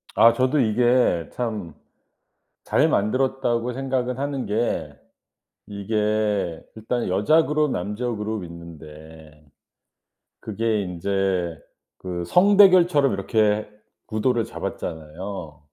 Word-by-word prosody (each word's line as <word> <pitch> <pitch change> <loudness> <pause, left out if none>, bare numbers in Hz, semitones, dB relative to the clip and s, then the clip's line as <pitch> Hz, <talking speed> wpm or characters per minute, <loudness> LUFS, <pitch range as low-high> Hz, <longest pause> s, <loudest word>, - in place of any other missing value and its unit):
아 115 +1 +6
저도 130 +3 +1
이게 120 - +2
참 105 -9 -4 0.9
잘 - - +3
만들었다고 125 +1 0
생각은 130 -1 -2
하는 140 -2 -3
게 110 +3 -2 0.8
이게 105 -3 -1 0.2
일단 115 +2 -3
여자 105 - +3
그룹, 150 0 +1
남자 105 +3 -3
그룹 110 -2 -3
있는데 80 -2 -13 1.0
그게 110 0 -1
인제 90 -2 -2 0.4
그 90 -2 -5
성 195 - +4
대결처럼 180 - +6
이렇게 105 +1 0 0.4
구도를 115 +2 0
잡았잖아요? 80 0 -7
105 Hz, 205 characters per minute, -23 LUFS, 90-125 Hz, 1.0 s, 아